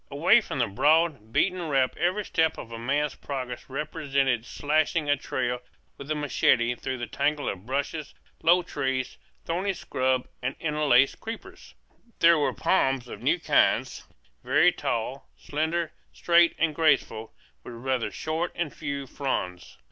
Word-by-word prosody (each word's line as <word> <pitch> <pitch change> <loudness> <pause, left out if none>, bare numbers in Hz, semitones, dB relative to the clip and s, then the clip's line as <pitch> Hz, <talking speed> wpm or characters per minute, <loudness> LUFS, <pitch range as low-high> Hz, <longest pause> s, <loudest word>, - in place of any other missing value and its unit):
Away - - +4
from - - -6
the - - +2
broad, 145 0 +2
beaten 185 +8 +1
route 135 -6 +1
every 185 +4 0
step 160 -1 +1
of 115 - -9
a 115 - -6
man's 145 +5 0
progress 130 -3 -6
represented 135 -4 -1
slashing 155 +1 0
a 145 - +4
trail 125 -3 -3 0.3
with 140 - -10
the 155 - -1
machete 125 -4 +2
through 130 +1 -4
the 120 - -4
tangle 145 +3 -1
of 95 +3 -5
bushes, 145 +3 -3 0.3
low 175 +2 +4
trees, 130 -4 -3 0.3
thorny 185 +4 -1
scrub, 130 -7 -1
and 125 +2 -2
interlaced 150 -4 +3
creepers. 370 +12 -9 0.4
There 170 -1 +5
were 145 - +1
palms 135 -8 +1
of - - -9
new - - +2
kinds, - - +1 0.4
very - - +4
tall, 120 +4 -3
slender, 160 +2 -2 0.2
straight, 170 0 +4
and 165 -2 +1
graceful, 140 -8 +1 0.3
with 120 - -9
rather 125 -2 -1
short 160 +8 -3
and 170 -4 -3
few 140 -2 -4
fronds. 90 - -4
145 Hz, 150 wpm, -26 LUFS, 130-160 Hz, 0.4 s, There